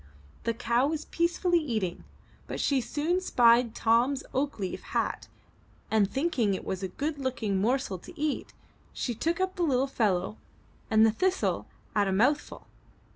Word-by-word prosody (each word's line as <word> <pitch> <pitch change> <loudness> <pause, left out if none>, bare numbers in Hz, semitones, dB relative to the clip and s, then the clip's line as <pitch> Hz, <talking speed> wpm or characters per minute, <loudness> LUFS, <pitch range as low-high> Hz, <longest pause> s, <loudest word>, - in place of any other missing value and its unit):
The 230 - 0
cow 235 +3 +2
was 310 0 -3
peacefully 345 +1 +1
eating, 220 - -3 0.4
but - - -5
she 275 -2 +2
soon 320 +8 -1
spied 235 -7 +4
Tom's 240 +5 +2
oak 280 +2 -1
leaf 190 -3 -4
hat - - -2 0.6
and, 210 -3 +3
thinking 260 - +1
it - - -7 0.2
a 190 - -2
good 290 - -3
looking 225 -8 -1
morsel 235 -4 0
to - - -13
eat, 300 -1 -2 0.4
she 245 - -2
took 330 - -1
up 375 0 -1
the - - -2
little 265 -4 +2
fellow 210 -7 0 0.5
and 220 -1 +6
the 220 - +4
thistle 375 - 0 0.3
at 205 -1 +3
a - - 0
mouthful. 255 +10 +1
250 Hz, 155 wpm, -28 LUFS, 220-300 Hz, 0.6 s, and